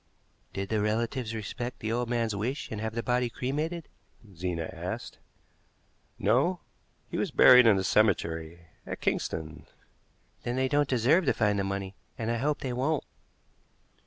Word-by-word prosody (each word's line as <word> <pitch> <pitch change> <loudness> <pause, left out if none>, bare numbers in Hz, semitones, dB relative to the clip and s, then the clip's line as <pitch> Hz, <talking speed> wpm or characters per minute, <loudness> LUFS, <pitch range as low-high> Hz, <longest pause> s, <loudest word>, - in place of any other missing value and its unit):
"Did 100 0 -4
the 110 -1 +1
relatives 115 +2 -1
respect 120 +3 -5
the 110 - -3
old 120 0 -1
man's 115 -3 0
wish 120 +8 -3
and 105 -2 -4
have 110 0 -3
the 115 - -2
body 125 -1 +1
cremated?" 150 +7 -3 0.5
Zena 85 -1 -2
asked. - - -6 1.0
"No; 135 - +2 0.5
he - - -2
was - - 0
buried 125 -2 +8
in 105 -3 +6
a 95 - 0
cemetery 85 -5 +1 0.2
at - - -5
Kingston." 80 +1 -3 0.7
"Then 120 - -3
they 130 0 +1
don't 145 +1 +2
deserve 135 +9 +3
to - - +3
find 105 -2 +1
the - - +1
money, 95 0 -3 0.2
and 115 0 -2
I 120 - 0
hope 145 +5 0
they 130 -2 -2
won't." 140 +5 0
115 Hz, 160 wpm, -29 LUFS, 100-130 Hz, 1.0 s, buried